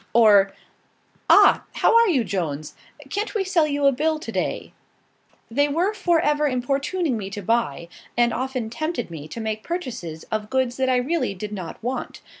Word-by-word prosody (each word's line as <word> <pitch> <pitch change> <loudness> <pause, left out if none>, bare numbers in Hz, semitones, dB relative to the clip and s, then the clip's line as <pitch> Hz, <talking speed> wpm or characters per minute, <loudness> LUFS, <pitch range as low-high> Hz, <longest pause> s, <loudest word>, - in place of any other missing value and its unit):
Or 205 -4 +6 0.8
"Ah! - - +7
how - - +3
are 465 0 +6
you, 285 - +2
Jones? 160 -7 -3 0.4
Can't 420 +3 -3
we 410 - +1
sell 345 -5 +2
you 285 -1 0
a 275 - +6
bill, 310 +4 0
to 310 - -7
day?" - - -3 0.8
They 285 +5 +2
were 345 +8 0
for 355 -5 +2
ever 295 0 +2
importuning 275 +3 -1
me 195 -2 -5
to 205 0 -6
buy, 180 -8 0 0.3
and 240 -1 +3
often 255 -3 -3
tempted 310 - -3
me 155 -2 -7
to 195 - -8
make 220 -1 -3
purchases 235 - -5
of 215 -1 -2
goods 260 -2 0
that 260 -1 +1
I 255 - +3
really 250 -4 0
did 210 +3 -6
not 185 -5 -6
want. 255 +2 -4
255 Hz, 180 wpm, -23 LUFS, 210-310 Hz, 0.8 s, Ah